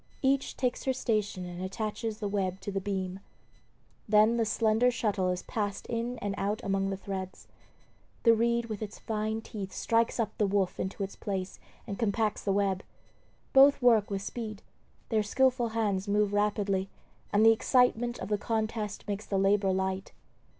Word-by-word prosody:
Each 270 0 +1
takes 250 -2 -1
her 265 - +2
station 215 -7 -1
and 175 0 -7
attaches 215 +3 -3
the 210 -2 -3
web 195 -2 -1
to 205 - -4
the 195 0 -2
beam. 190 -1 -3 0.9
Then 215 +2 +5
the 230 - +2
slender 220 +2 +3
shuttle 205 -6 0
is 180 0 -2
passed 205 -3 -3
in 235 +1 -3
and 205 -1 -1
out 205 +2 -1
among 195 0 0
the 195 - -2
threads. 190 -1 -6 0.8
The 230 - +7
reed 235 +1 +1
with 215 -2 -6
its 215 0 -6
fine 220 0 -2
teeth 200 -4 -6
strikes 230 +1 +1
up 220 -2 -1
the 210 - +3
woof 195 -2 0
into 190 +2 -3
its 195 - -5
place 190 -2 -4 0.3
and 200 -4 -6
compacts 215 -1 0
the 200 - +1
web. 195 -1 +1 0.7
Both 275 +1 +7
work 230 -5 +4
with 195 -1 -3
speed; 215 -2 -6 0.5
their 220 -2 +2
skilful 250 +3 +2
hands 210 -3 -1
move 205 0 +2
rapidly, 205 -2 +1 0.4
and 210 +2 +4
the 225 - +9
excitement 245 0 +2
of 185 - -6
the 210 -1 +1
contest 220 -2 -2
makes 205 +1 -4
the 195 - 0
labor 195 0 +3
light. 190 0 -2
210 Hz, 170 wpm, -29 LUFS, 195-230 Hz, 0.9 s, the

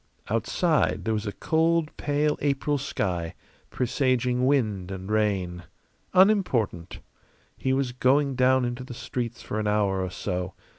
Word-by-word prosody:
Outside 150 +8 +1
there 110 - +1
was 105 0 -2
a - - -1
cold, 165 +4 +1
pale 150 +1 0
April 145 0 0
sky, 90 -10 -2 0.3
presaging 125 0 +1
wind 105 -10 +1
and 95 +1 -6
rain. 95 -5 0 0.5
Unimportant. 180 - +2 0.5
He 130 - -1
was 135 -1 +1
going 135 +3 +2
down 130 0 +3
into 120 +1 -4
the 125 -1 -9
streets 120 -1 -4
for 110 - -3
an 105 - -1
hour 100 -2 +1
or 95 - -3
so. 90 +1 -4
125 Hz, 140 wpm, -26 LUFS, 105-140 Hz, 0.5 s, down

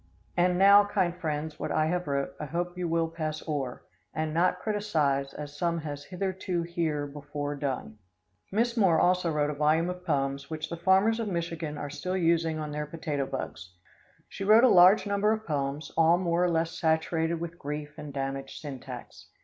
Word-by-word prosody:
And 180 0 +3
now, 200 +2 +7
kind 185 -4 0
friends, 155 -3 -4
what - - -3
I 155 - +2
have 175 +1 -1
wrote, 140 -1 -1
I 150 - -3
hope 175 +4 -3
you 180 -1 -2
will 165 0 +1
pass 155 -1 -5
o'er 140 -5 -3 0.3
And 155 0 -1
not 180 +2 +2
criticise 155 -10 0
as 145 -1 -7
some 170 -1 +1
has 145 -2 -6
hitherto 185 -1 -2
here 165 -4 -1
before 145 0 -5
done." 135 -6 -4 0.5
Miss 230 +4 +1
Moore 185 -8 +4
also 180 -1 +3
wrote 150 -1 +1
a - - -3
volume 155 +4 +2
of 180 0 -9
poems 140 -4 -1
which 155 -1 -4
the 170 - -3
farmers 190 +6 +3
of 225 - -2
Michigan 165 -4 -3
are 145 -1 -5
still 185 +5 -3
using 165 -2 +2
on 155 -1 -4
their 150 0 -3
potato 150 -3 -3
bugs. 90 +1 -6 0.5
She - - -7
wrote 215 +4 +6
a 255 - +7
large 185 +3 +7
number 205 +1 +2
of 220 0 -4
poems, 145 0 -2
all 165 +1 +5
more 175 -1 +1
or - - +2
less 165 0 0
saturated 160 +1 0
with 170 0 -6
grief 150 +1 -5
and 150 -1 -7
damaged 135 0 -4
syntax. 140 -4 -9
165 Hz, 190 wpm, -28 LUFS, 150-180 Hz, 0.5 s, now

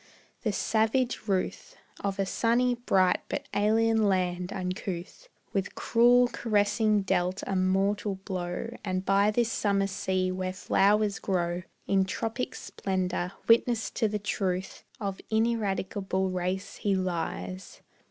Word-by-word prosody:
The 220 - 0
savage 225 +3 0
ruth 190 -2 -2 0.2
Of 200 -1 -2
a 195 - +1
sunny, 240 +5 +2
bright, 190 -7 +2
but - - -3
alien 220 +1 +3
land, 180 -1 0
uncouth 185 - -5 0.2
With 195 -1 -2
cruel 245 +1 +5
caressing 215 -2 +2
dealt 180 0 0
a 195 - -2
mortal 195 +2 +1
blow, 190 +3 -4
And 185 -1 -2
by 200 +2 +4
this 230 +1 +1
summer 200 -1 +1
sea 185 -1 -1
where 185 0 -3
flowers 200 +2 +2
grow 175 -2 -1 0.2
In 195 -1 +2
tropic 225 +5 -3
splendor, 185 -1 -2
witness 230 0 +3
to 225 - +1
the 210 0 -1
truth 195 -2 -2 0.2
Of 200 -3 -4
ineradicable 200 -4 0
race 185 +1 -3
he 200 -2 +1
lies. 165 - -4
195 Hz, 125 wpm, -28 LUFS, 185-220 Hz, 0.2 s, cruel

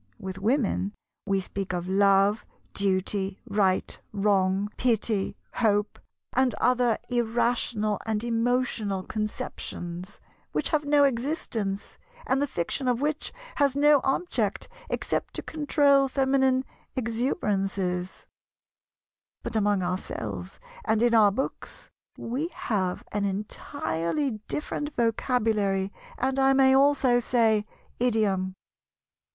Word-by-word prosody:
With 190 0 -6
Women, 210 -3 +1 0.3
we 195 -1 +2
speak 190 0 -4
of 175 0 -3
"love," 195 +2 +4 0.3
"duty," 195 0 0
"right," 195 -2 +1
"wrong," 195 0 +1
"pity," 220 -4 +1 0.2
"hope," 210 -3 +1 0.3
and 260 -1 +2
other 245 -2 +2
irrational 230 -3 0
and 220 0 0
emotional 230 -4 0
conceptions, 185 -3 -5 0.3
which - - +1
have 300 -2 +1
no 290 0 +5
existence, 235 -7 -1 0.3
and 270 -9 +1
the 285 - +1
fiction 250 +6 -2
of 245 -1 +2
which 300 +2 -1 0.3
has 280 -2 +3
no 290 -1 +5
object 345 +7 -1 0.2
except - - -2
to - - -4
control 285 -3 +3
feminine 265 -1 +2 0.3
exuberances; 200 - -1 1.2
but - - -4
among 205 -3 +2
ourselves, 180 +1 -4 0.2
and 220 - +2
in 240 -1 +4
our 215 -3 +7
books, 265 +7 -5 0.3
we 260 +8 -2
have 190 - -2
an 205 -1 -1
entirely 215 - -2
different 295 0 -3
vocabulary 215 -4 +1 0.2
and 265 +1 0
I 270 0 +5
may 265 0 +5
also 270 -3 +4
say, 225 -3 +2 0.3
idiom. 205 -6 +1
225 Hz, 110 wpm, -27 LUFS, 195-265 Hz, 1.2 s, our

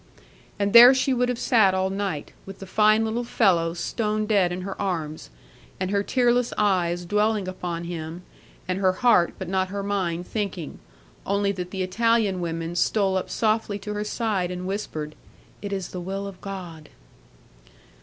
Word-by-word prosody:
And 200 0 0
there 240 +3 +10
she 260 +1 +1
would 250 0 +1
have 250 - -1
sat 215 -7 +3
all 190 0 0
night, 195 -7 -3
with 195 - -8
the 195 - -9
fine 215 +3 +3
little 225 +2 -2
fellow 175 -8 +2
stone 215 +4 -1
dead 200 -5 +2
in 180 +1 -4
her 195 +1 -6
arms, 155 - -3 0.5
and 185 0 -2
her 200 -1 +2
tearless 245 +2 +1
eyes 175 -4 +1
dwelling 210 +1 +1
upon 175 -2 -4
him, 170 0 -6 0.4
and 185 +1 -1
her 190 -1 +3
heart 220 -5 +3
but 190 - -6
not 190 +1 0
her 200 +1 -4
mind 180 -4 -2
thinking, 195 -7 -4 0.4
only 200 0 0
that 180 -2 -5
the 190 0 -3
Italian 210 0 +1
women 165 0 -3
stole 195 +1 +1
up 185 - -2
softly 215 -2 0
to 210 +1 -6
her 210 0 -2
side, 210 -4 -1
and 180 0 -5
whispered, 160 -6 -4 0.5
"It 200 - -5
is 195 -3 -3
the 180 - -6
will 195 +2 -4
of 195 -2 -9
God." 175 -6 -8
195 Hz, 175 wpm, -24 LUFS, 180-210 Hz, 0.5 s, there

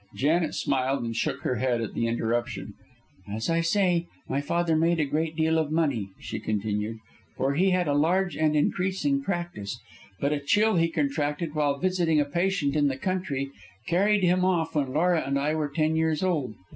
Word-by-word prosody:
Janet 155 +3 +1
smiled 135 -1 0
and 115 -1 -3
shook - - -1
her 125 - -1
head 125 0 +1
at 115 - -4
the 115 - 0
interruption. 115 -2 -2 0.6
"As 110 +8 -2
I 165 0 +2
say, 175 -1 +2 0.2
my 135 +2 -1
father 165 +2 0
made 165 +1 +2
a 150 - +2
great 155 +3 -1
deal 160 0 +2
of 155 -2 -1
money," 140 -11 0
she - - -5
continued, 105 +1 -2 0.4
"for 135 +2 +1
he 185 +6 +3
had 180 -2 +1
a 145 - +2
large 175 +4 +2
and 155 -1 +2
increasing 190 - +1
practice, 175 - -4 0.4
but 140 +1 +1
a 150 - -1
chill 205 +8 +2
he 165 0 +3
contracted 150 +1 -1
while 145 -2 +1
visiting 175 -3 +1
a 145 - +2
patient 170 -1 0
in 145 -1 +3
the 135 -1 -1
country 140 -6 -2 0.3
carried 200 +3 +2
him 180 +1 +3
off 170 -3 +1
when 140 -4 0
Laura 170 +3 +2
and 140 +1 -1
I 145 +2 0
were 155 -2 -1
ten 155 +2 0
years 160 0 +1
old. 150 -12 0
155 Hz, 190 wpm, -26 LUFS, 140-175 Hz, 0.6 s, he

